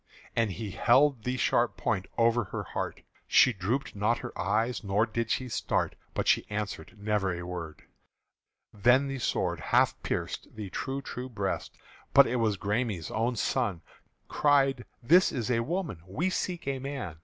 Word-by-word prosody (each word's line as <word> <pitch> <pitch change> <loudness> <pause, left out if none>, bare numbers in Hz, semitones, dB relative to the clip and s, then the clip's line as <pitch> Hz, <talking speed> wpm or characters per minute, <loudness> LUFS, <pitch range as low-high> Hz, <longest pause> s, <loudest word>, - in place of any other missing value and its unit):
And 110 -4 +1
he 100 +3 -5
held 130 +3 +3
the 125 +1 -1
sharp - - +2
point 95 - -1
over 115 -1 +3
her - - -5
heart: - - -4 0.3
She 130 - +6
drooped 110 +8 -2
not 105 +4 +1
her - - -7
eyes 110 +6 0
nor 100 +2 +2
did 115 0 -3
she 130 - 0
start, 115 - -1 0.2
But - - -1
she - - +3
answered 105 +2 -4
never 105 -2 0
a 90 - -6
word. 85 -4 -6 0.9
Then 125 +7 +4
the 135 -1 -4
sword 85 -7 -1
half - - +3
pierced - - -4
the 105 -4 -6
true 135 +7 -3
true 125 +1 -6
breast: 100 -5 -3 0.4
But - - +9
it 125 - -1
was 110 -3 +1
the - - -30
Græme's 105 -5 -1
own 115 +3 0
son 105 -6 -1 0.4
Cried, 135 -3 +2 0.2
"This 175 +9 +5
is 125 -1 -2
a 115 - +2
woman 155 - -3
we 165 - -1
seek 180 -4 -3
a 135 -1 -1
man!" 130 - -5
115 Hz, 170 wpm, -29 LUFS, 100-130 Hz, 0.9 s, But